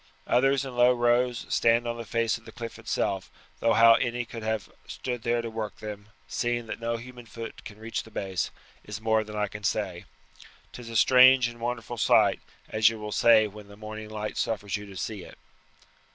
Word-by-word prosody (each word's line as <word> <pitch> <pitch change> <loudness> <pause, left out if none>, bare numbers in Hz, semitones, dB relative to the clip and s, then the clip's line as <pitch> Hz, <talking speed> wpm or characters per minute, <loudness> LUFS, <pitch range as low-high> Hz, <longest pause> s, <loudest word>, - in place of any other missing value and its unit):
Others 135 +2 +2
in 130 -2 -7
low 120 +1 +5
rows 120 0 +1
stand 115 +1 +3
on 120 - -2
the 115 0 -7
face 115 0 0
of - - -25
the - - -10
cliff 115 -1 -8
itself, 100 -3 -2 0.3
though 115 0 +3
how 115 0 +8
any 120 +1 0
could 115 0 -8
have 110 -2 -2 0.2
stood 125 -2 -4
there 120 +1 0
to 115 - -4
work 110 -2 -4
them, 105 -1 -8 0.2
seeing 120 -1 -1
that 110 - -6
no 115 0 -1
human 120 0 -11
foot 115 +1 -8
can 105 - -10
reach 115 +1 -4
the - - -14
base, 95 -4 -2 0.3
is 105 0 -7
more 110 0 +2
than 105 0 -9
I 105 0 0
can 105 +1 -9
say. 95 -4 -2 0.7
'Tis 120 -2 -9
a 115 - -7
strange 130 +2 +7
and 120 0 -12
wonderful 120 0 -4
sight, - - +4 0.3
as 110 0 +4
you 115 - -6
will 105 0 -6
say 110 0 +5
when 105 0 -9
the 100 0 -14
morning 110 0 -8
light 105 0 -5
suffers 105 -3 -1
you 105 0 -6
to 95 -1 -10
see 105 0 -4
it." - - -13
115 Hz, 210 wpm, -27 LUFS, 105-120 Hz, 0.7 s, how